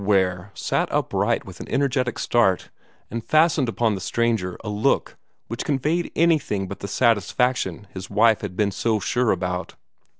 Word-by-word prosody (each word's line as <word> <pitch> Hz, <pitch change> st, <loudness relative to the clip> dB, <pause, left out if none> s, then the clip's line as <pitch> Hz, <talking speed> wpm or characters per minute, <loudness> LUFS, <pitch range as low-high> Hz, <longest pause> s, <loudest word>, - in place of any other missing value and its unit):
Ware 95 Hz, -2 st, +1 dB
sat -, -, -1 dB
upright -, -, 0 dB
with -, -, -11 dB
an -, -, -8 dB
energetic 130 Hz, -3 st, 0 dB
start, 110 Hz, -6 st, +1 dB, 0.4 s
and 115 Hz, +1 st, -4 dB
fastened 155 Hz, -3 st, +3 dB
upon 115 Hz, -1 st, +1 dB
the 95 Hz, -, -4 dB
stranger 110 Hz, -2 st, 0 dB
a -, -, -7 dB
look 105 Hz, +1 st, 0 dB, 0.3 s
which 115 Hz, +1 st, -4 dB
conveyed 150 Hz, +5 st, 0 dB
anything 150 Hz, -, +2 dB
but 100 Hz, -, -7 dB
the 100 Hz, -, -5 dB
satisfaction 115 Hz, -2 st, +1 dB
his 95 Hz, -1 st, -7 dB
wife 110 Hz, +2 st, +4 dB
had 100 Hz, -3 st, -5 dB
been 105 Hz, -2 st, +2 dB
so 110 Hz, +2 st, 0 dB
sure 120 Hz, +4 st, 0 dB
about. 90 Hz, 0 st, -3 dB
110 Hz, 160 wpm, -23 LUFS, 95-125 Hz, 0.4 s, wife